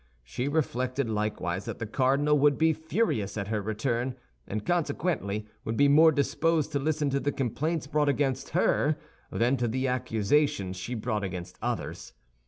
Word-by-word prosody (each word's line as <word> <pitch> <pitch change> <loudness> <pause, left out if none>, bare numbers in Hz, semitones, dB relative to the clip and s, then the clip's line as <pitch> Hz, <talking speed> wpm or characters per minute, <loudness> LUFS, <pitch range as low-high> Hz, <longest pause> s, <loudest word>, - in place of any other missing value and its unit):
She 90 - -3
reflected 130 -3 0
likewise 105 -3 -2
that - - -5
the 115 - -4
cardinal 135 +6 +2
would 145 0 +4
be 160 0 +4
furious 160 - -1
at 100 -1 -3
her 110 -1 0
return, 115 +4 -1 0.3
and 105 +1 -4
consequently 145 - -1 0.2
would 110 0 -3
be 145 - +5
more 155 +3 +7
disposed 155 +1 +1
to 140 - 0
listen 150 0 0
to 140 - +1
the 145 - 0
complaints 145 +5 -1
brought 150 0 +1
against 135 -2 0
her 150 +1 +2 0.3
than 120 +4 +2
to 120 -1 0
the 130 +4 -1
accusations 115 -4 +1
she 115 +7 -5
brought 110 -2 -2
against 90 -1 -6
others. - - -4
130 Hz, 165 wpm, -28 LUFS, 110-150 Hz, 0.3 s, more